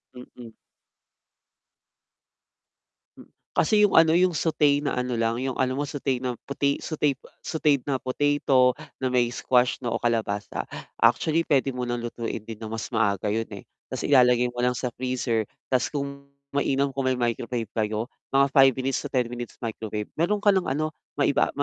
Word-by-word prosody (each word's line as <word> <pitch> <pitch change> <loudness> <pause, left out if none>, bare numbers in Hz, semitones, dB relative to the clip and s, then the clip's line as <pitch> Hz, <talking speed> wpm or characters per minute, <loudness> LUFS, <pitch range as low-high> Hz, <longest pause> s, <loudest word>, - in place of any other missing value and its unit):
Mm. 125 -2 -11 2.7
Hmm. - - -13 0.3
Kasi 210 +6 +4
yung - - +2
ano, 160 0 +6
yung 175 -2 +3
sauté 150 -3 +3
na - - 0
ano 125 -1 -1
lang, 115 +1 0
yung 130 -1 -2
ano 130 0 +1
alam - - -4
mo - - 0
sauté 135 -4 -2
na 125 -2 -3
pota 140 0 0
sauté 150 -4 -1 0.2
sautéd 150 -4 +1
na 135 - +1
potato 130 -1 +2 0.2
na 130 - +1
may 120 -1 +1
squash 125 0 +2
na 120 - -2
o - - 0
kalabasa. 110 -4 -1 0.4
Actually 160 +1 +3
puwede 135 -4 +1
mo 125 - -4
ng 120 0 -2
lutuin 115 -2 -5
din 115 -1 -8
na 110 - -5
mas 115 0 -4
maaga 105 -1 +1
yun, 115 0 -2
eh, - - -9 0.2
ta's - - -4
ilalagay 125 -3 +5
mo 120 - -3
lang 125 -1 +1
sa 125 -2 -3
freezer 125 -3 -1 0.2
ta's 125 - +2
kung 140 -1 -5 0.2
mainam 140 -1 +1
kung 130 -1 0
may 130 - 0
microwave 120 -1 -2
kayo 110 +1 -1 0.2
mga 135 0 +5
5 135 -1 +7
minutes 130 0 -1
to - - -3
10 125 -3 +1
minutes 120 -1 -6
microwave 110 -2 -4
meron 205 +5 +2
ka 205 - +6
ng 190 -1 +2
ano, 155 +3 -1 0.3
maipa 140 0 +2
130 Hz, 175 wpm, -25 LUFS, 120-140 Hz, 2.7 s, 5